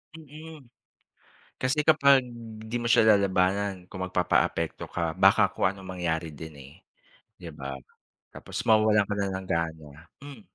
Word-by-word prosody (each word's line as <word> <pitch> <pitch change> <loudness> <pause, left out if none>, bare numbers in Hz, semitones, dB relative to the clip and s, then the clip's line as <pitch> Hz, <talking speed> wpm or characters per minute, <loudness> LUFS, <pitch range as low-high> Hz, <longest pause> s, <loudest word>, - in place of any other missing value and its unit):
Mm. 155 0 -12 1.0
Kasi 140 +4 0
kapag, 140 -4 +5 0.4
'di 110 +2 -5
mo 120 - -2
siya 115 - +5
lalabanan, 95 0 0
kung 95 - -9
magpapaapekto 90 -1 -1
ka, 85 -2 -2
baka 95 +1 +4
kung - - +1
anong 95 -1 -7
mangyari 80 -2 -2
din, 80 +2 -10
eh, 70 +1 -13 0.7
'di 85 -2 -9
ba? 70 -2 -6 0.6
Tapos - - -8
mawawalan 110 -2 +4
ka 105 - -2
na 100 -1 -1
ng 95 -1 -7
gana. 80 -3 -3 0.3
Hmm? 140 -5 -11
95 Hz, 140 wpm, -26 LUFS, 85-120 Hz, 1.0 s, kapag